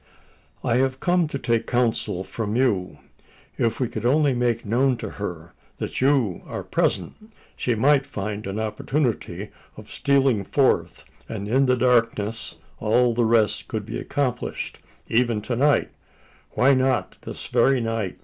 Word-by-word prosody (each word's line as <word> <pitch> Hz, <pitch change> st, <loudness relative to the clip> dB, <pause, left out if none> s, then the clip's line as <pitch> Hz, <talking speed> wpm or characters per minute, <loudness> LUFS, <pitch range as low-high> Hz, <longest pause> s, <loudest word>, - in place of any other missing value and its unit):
"I 115 Hz, -, +2 dB
have 130 Hz, 0 st, +1 dB
come 175 Hz, 0 st, +2 dB
to 145 Hz, -, -4 dB
take 115 Hz, -3 st, 0 dB
counsel 120 Hz, -6 st, 0 dB
from 105 Hz, +3 st, -4 dB
you. 105 Hz, -8 st, +1 dB, 0.6 s
If 115 Hz, -1 st, +1 dB
we 125 Hz, -, +1 dB
could 115 Hz, -2 st, -6 dB
only 140 Hz, +3 st, +3 dB
make 120 Hz, -2 st, 0 dB
known 125 Hz, +4 st, +2 dB
to -, -, -5 dB
her 85 Hz, -3 st, -5 dB, 0.2 s
that -, -, -4 dB
you 130 Hz, -9 st, +2 dB
are -, -, -5 dB
present, 215 Hz, +1 st, -2 dB, 0.2 s
she 120 Hz, -, 0 dB
might 135 Hz, +4 st, +3 dB
find 105 Hz, -4 st, -4 dB
an 100 Hz, +2 st, -3 dB
opportunity 120 Hz, +3 st, -2 dB, 0.3 s
of -, -, -12 dB
stealing 135 Hz, -6 st, +2 dB
forth; 135 Hz, +7 st, +1 dB, 0.2 s
and 100 Hz, -2 st, -5 dB
in 130 Hz, +5 st, +3 dB
the 125 Hz, 0 st, +3 dB
darkness, 115 Hz, -3 st, +1 dB, 0.2 s
all 120 Hz, +2 st, +3 dB
the 120 Hz, 0 st, +2 dB
rest 110 Hz, -1 st, +2 dB
could 110 Hz, -4 st, -4 dB
be 110 Hz, -, -5 dB
accomplished. 130 Hz, -4 st, -3 dB, 0.3 s
Even 115 Hz, -1 st, +2 dB
to 120 Hz, -, -2 dB
night 145 Hz, +4 st, +2 dB, 0.6 s
why 140 Hz, +2 st, +5 dB
not 130 Hz, -1 st, 0 dB
this -, -, -7 dB
very 135 Hz, -1 st, +3 dB
night?" 115 Hz, -5 st, -2 dB
120 Hz, 150 wpm, -24 LUFS, 110-135 Hz, 0.6 s, why